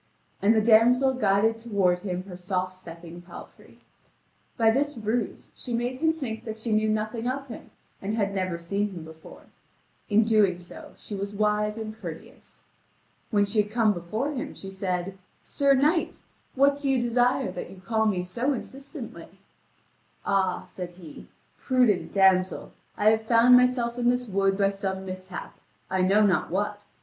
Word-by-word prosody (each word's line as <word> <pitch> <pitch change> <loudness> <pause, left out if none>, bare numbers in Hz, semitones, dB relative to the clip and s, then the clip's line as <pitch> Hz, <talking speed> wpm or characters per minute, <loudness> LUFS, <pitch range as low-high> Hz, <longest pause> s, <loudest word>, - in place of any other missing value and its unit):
And 215 +3 +4
the 215 - +3
damsel 245 +4 +5
guided 225 -1 +2
toward 200 -6 +1
him 180 -2 -4
her 185 -2 -10
soft 185 0 -2
stepping 170 -1 -11
palfrey. 175 0 -14 0.8
By 225 -2 +5
this 285 +3 0
ruse 220 +1 -3
she 240 - -5
made 245 +2 -2
him 320 0 +4
think 265 -9 -5
that 220 -2 -6
she 220 +1 -4
knew 215 0 +2
nothing 215 +2 -2
of 270 +2 -2
him 230 - -9 0.3
and 205 +3 -2
had 200 -3 0
never 185 -3 -2
seen 200 +4 -2
him 170 -3 -7
before; 160 0 -13 0.7
in 215 +1 +4
so 225 - -3 0.6
doing - - -20
she - - -9
was 200 +1 -4
wise 210 +1 +1
and 215 -1 -6
courteous. 220 - -9 0.7
When 205 -2 +3
she 210 +1 +2
had 205 - -6
come 220 -1 +2
before 215 - -3
him, 280 +1 -5
she 195 - -8
said: 190 0 -3 0.2
"Sir 280 -1 +2
knight, 305 +5 +1 0.3
what 280 +1 +3
do 285 -1 -1
you 265 -1 +3
desire 245 +2 +1
that - - -6
you 190 - -12
call 220 +3 0
me 185 -4 0
so 240 +10 -1
insistently?" 255 - -8 0.9
"Ah," 190 -2 0
said 180 -1 -7
he, 175 -4 -12 0.3
"prudent 250 -8 +2
damsel, 190 -1 +2 0.3
I 215 +1 +5
have 220 0 -1
found 235 +2 +6
myself 250 -1 +2
in 240 0 +3
this 250 0 0
wood 195 -1 +1
by 200 -1 +2
some 190 -1 -4
mishap 185 -1 -8 0.3
I 190 -1 +1
know 200 +3 +4
not 180 -5 +1
what. 205 +2 -3
215 Hz, 170 wpm, -26 LUFS, 190-240 Hz, 0.9 s, found